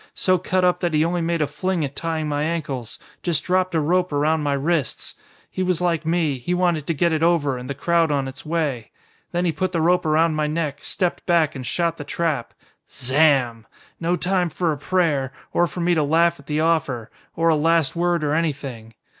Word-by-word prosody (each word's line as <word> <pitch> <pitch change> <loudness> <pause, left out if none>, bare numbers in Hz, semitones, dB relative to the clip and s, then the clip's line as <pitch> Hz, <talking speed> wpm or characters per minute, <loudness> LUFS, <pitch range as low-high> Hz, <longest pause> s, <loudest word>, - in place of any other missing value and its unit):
So 185 -1 +2
cut 185 +1 +1
up 180 - +2
that 170 -3 -1
he 155 +1 +3
only 175 +1 0
made 165 -1 0
a - - +2
fling 160 +3 -2
at 140 0 -7
tying 160 -2 -2
my 145 -1 -1
ankles, 150 -7 -3 0.2
just 170 -4 0
dropped 185 -1 +1
a - - +3
rope 180 +4 +1
around 150 +2 +1
my 145 -1 0
wrists. 145 -2 -1 0.4
He 185 - -3
was 180 -2 +1
like 170 -3 0
me, 160 -5 +1
he 175 +9 -1
wanted 175 -5 0
to 165 - 0
get 170 +2 +2
it 155 - 0
over, 165 -5 +2
and 125 +1 -7
the 140 - -3
crowd 170 +2 +2
on 140 -2 0
its 135 - -9
way. 150 -8 -2 0.4
Then 175 +1 0
he 170 - +2
put 185 +2 -2
the 170 - +1
rope 175 +3 +3
around 160 +1 +2
my 155 -1 0
neck, 150 -2 -2
stepped 180 -3 -2
back 170 -4 +3
and 130 - -6
shot 170 -1 0
the 145 - -6
trap. 155 -5 -2 0.3
Zamm! 130 -4 +2 0.3
No 170 +1 +1
time 180 0 0
for 170 +1 -1
a 150 - -2
prayer 145 -6 0 0.2
or 175 - +3
for 175 +2 -6
me 175 +1 +2
to 160 - +2
laugh 165 +3 +2
at 140 - -17
the 150 0 0
offer! 140 -8 0 0.2
or 165 0 +2
a 160 - +4
last 165 -1 +2
word 175 -1 +1
or 145 0 0
anything. 135 -8 -3
160 Hz, 220 wpm, -22 LUFS, 145-175 Hz, 0.4 s, a